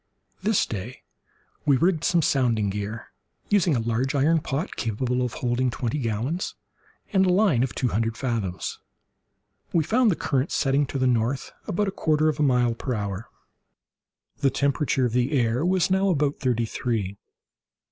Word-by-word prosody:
This 215 -1 +2
day 110 +4 -6 0.6
we 140 -3 +4
rigged 165 +1 +2
some 170 -2 +3
sounding 115 -8 +1
gear, 105 +3 -5 0.4
using 190 -7 +3
a - - +1
large 120 +5 -1
iron 155 +4 +3
pot 150 +4 -3
capable 125 +3 -1
of 125 -2 -1
holding 125 +1 0
twenty 120 +3 -2
gallons, 125 - -2 0.6
and 190 -1 +4
a - - +4
line 185 - +3
of 130 -1 -1
two 125 - 0
hundred 115 +2 -1
fathoms. 110 -9 -3 0.9
We 165 - +3
found 235 - +3
the 185 - +2
current 140 -1 -1
setting 140 0 +2
to 135 - -4
the 130 - +1
north, 125 +2 0 0.2
about 205 +4 0
a - - -1
quarter 155 -4 +1
of 150 - -3
a - - +1
mile 125 -4 +3
per 125 +2 -3
hour. 100 0 -4 1.1
The 140 - +3
temperature 140 -1 +1
of 120 - -1
the 125 +4 +1
air 120 +3 +1
was 185 0 +2
now 190 +1 +3
about 145 -4 +1
thirty 120 -3 +1
three. 110 -5 -3
130 Hz, 165 wpm, -25 LUFS, 115-155 Hz, 1.1 s, we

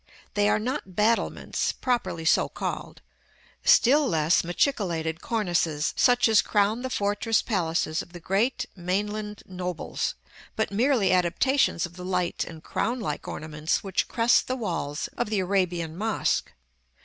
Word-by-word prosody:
They 205 0 +2
are - - +3
not 220 -4 -4
battlements, 225 +4 +1
properly 190 -10 -2
so - - +3
called; - - -5 0.6
still 285 +4 +5
less 160 -4 +3
machicolated 170 - -1
cornices, 170 -8 0
such 245 -1 +4
as 220 -2 +5
crown 210 +3 +1
the 260 - -3
fortress 210 0 +1
palaces 165 -6 0
of 175 - -12
the 175 - -9
great 225 +9 0
mainland 210 +3 -3
nobles; 180 -2 -3 0.4
but 220 - -1
merely 230 -2 +2
adaptations 180 +3 +2
of 175 +1 -11
the 180 - -7
light 180 -1 -1
and 160 -1 -10
crown 235 +5 -1
like 150 -10 -4
ornaments 155 0 -2
which 195 -2 -1
crest 235 0 +3
the 255 - -1
walls 170 - -3
of - - -1
the 215 - 0
Arabian 180 -4 0
mosque. 215 +4 0
195 Hz, 140 wpm, -26 LUFS, 170-225 Hz, 0.6 s, still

